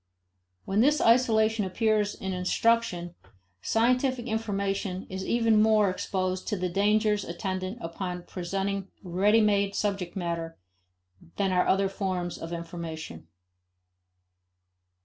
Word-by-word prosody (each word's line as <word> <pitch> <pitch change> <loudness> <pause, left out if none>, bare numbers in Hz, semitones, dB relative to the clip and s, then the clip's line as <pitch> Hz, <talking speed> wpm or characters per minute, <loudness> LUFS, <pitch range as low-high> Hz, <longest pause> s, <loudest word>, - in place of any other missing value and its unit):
When 195 +2 0
this 295 +4 +4
isolation 225 -2 +3
appears 210 +2 +1
in 190 0 -4
instruction, 180 -1 +1 0.5
scientific 250 +2 +1
information 200 -4 -2
is 190 0 -4
even 225 -1 +3
more 215 -3 +4
exposed 185 0 -2
to 210 - -1
the 180 0 -1
dangers 210 +2 +2
attendant 185 +3 -4
upon 180 +1 -5
presenting 195 +2 -3 0.2
ready 200 +5 +3
made 200 -1 +2
subject 195 -4 -2
matter 170 -3 -3 0.8
than 195 -2 0
are 180 -1 +2
other 195 +1 +3
forms 185 -3 -3
of 165 - -7
information. 165 - -7
195 Hz, 110 wpm, -27 LUFS, 180-215 Hz, 0.8 s, this